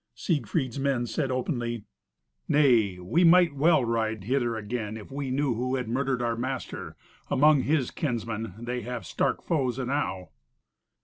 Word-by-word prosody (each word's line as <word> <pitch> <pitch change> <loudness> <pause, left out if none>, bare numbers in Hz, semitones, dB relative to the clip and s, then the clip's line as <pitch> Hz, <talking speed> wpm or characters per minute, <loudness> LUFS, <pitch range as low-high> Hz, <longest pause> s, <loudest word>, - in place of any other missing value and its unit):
Siegfried's 135 - -1
men 135 -3 +1
said 135 +4 -2
openly, 120 -3 -2 0.6
"Nay, 120 -10 +4
we 90 - +1
might 175 -2 +6
well 145 -1 +3
ride 110 -3 -1
hither 120 +1 0
again 110 0 -4
if 105 - -11
we 140 -1 -3
knew 135 0 +1
who 125 +3 -1
had 125 -3 -2
murdered 130 +1 0
our 115 -1 0
master. 130 +2 -5 0.3
Among 150 0 +5
his 145 -3 +1
kinsmen 115 - -3
they 120 +2 -4
have 120 -3 -5
stark - - -1
foes 130 -7 0
enow." 125 -9 -2
125 Hz, 145 wpm, -27 LUFS, 115-140 Hz, 0.6 s, might